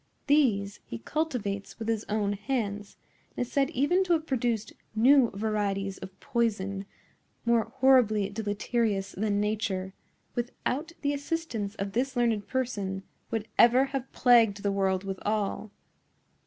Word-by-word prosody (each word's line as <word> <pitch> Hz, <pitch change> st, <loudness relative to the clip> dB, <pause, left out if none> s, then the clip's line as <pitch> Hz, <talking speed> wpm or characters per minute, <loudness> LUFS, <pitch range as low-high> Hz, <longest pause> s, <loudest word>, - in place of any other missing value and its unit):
These 225 Hz, -9 st, +2 dB
he 115 Hz, -, -5 dB
cultivates 205 Hz, -, -3 dB
with 225 Hz, -, -5 dB
his 225 Hz, -1 st, -1 dB
own 205 Hz, -1 st, 0 dB
hands, 205 Hz, -2 st, -3 dB, 0.4 s
and 245 Hz, -, 0 dB
is -, -, -17 dB
said 275 Hz, -1 st, +2 dB
even 340 Hz, +6 st, +2 dB
to 355 Hz, -, +3 dB
have 320 Hz, -1 st, 0 dB
produced 240 Hz, -6 st, -1 dB, 0.2 s
new 250 Hz, +2 st, +6 dB
varieties 200 Hz, -2 st, -1 dB
of 190 Hz, 0 st, -10 dB
poison, 200 Hz, -4 st, -1 dB, 0.6 s
more 235 Hz, -1 st, +3 dB
horribly 250 Hz, -6 st, +4 dB
deleterious 205 Hz, -1 st, -1 dB
than 205 Hz, 0 st, 0 dB
Nature, 200 Hz, -3 st, -1 dB, 0.4 s
without 255 Hz, +6 st, -3 dB
the 285 Hz, 0 st, +1 dB
assistance 285 Hz, -9 st, -3 dB
of 195 Hz, -1 st, -3 dB
this 260 Hz, +5 st, -1 dB
learned 230 Hz, -4 st, +1 dB
person, 200 Hz, -7 st, -2 dB, 0.3 s
would 225 Hz, -1 st, -2 dB
ever 250 Hz, +3 st, +7 dB
have 265 Hz, -1 st, -3 dB
plagued 230 Hz, -5 st, +4 dB
the 200 Hz, -, +1 dB
world 190 Hz, -1 st, +1 dB
withal. 205 Hz, +2 st, -2 dB
220 Hz, 135 wpm, -28 LUFS, 200-255 Hz, 0.6 s, ever